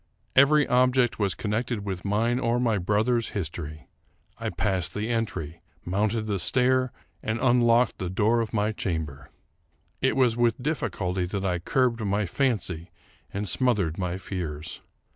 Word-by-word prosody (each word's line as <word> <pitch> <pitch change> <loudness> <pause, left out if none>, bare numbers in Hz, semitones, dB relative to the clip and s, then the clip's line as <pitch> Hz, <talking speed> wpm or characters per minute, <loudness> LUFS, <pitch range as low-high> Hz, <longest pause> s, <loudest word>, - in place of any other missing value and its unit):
Every 145 +2 +6
object 125 -1 +3
was 100 -3 +1
connected 110 0 -2
with 95 -3 -4
mine 115 +5 +1
or 120 0 +1
my 115 -4 +1
brother's 110 +5 +1
history. 75 -5 -5 0.5
I - - -2
passed 95 -5 -1
the 105 +2 -2
entry, 85 -9 -3 0.2
mounted 105 +5 0
the 100 -3 -1
stair, 130 +5 +2 0.3
and 110 +2 -2
unlocked 120 -2 +3
the 90 - -2
door 110 +5 +2
of 110 - -3
my 105 -1 +1
chamber. 80 -9 -4 0.7
It - - +2
was 125 -4 +3
with 120 0 +2
difBculty 95 - -2
that 100 0 -3
I 90 -2 0
curbed 120 +5 +1
my 100 0 0
fancy 90 - -1 0.4
and 100 +1 -3
smothered 105 -12 +1
my 90 -1 -2
fears. 80 -5 -5
105 Hz, 145 wpm, -26 LUFS, 90-120 Hz, 0.7 s, Every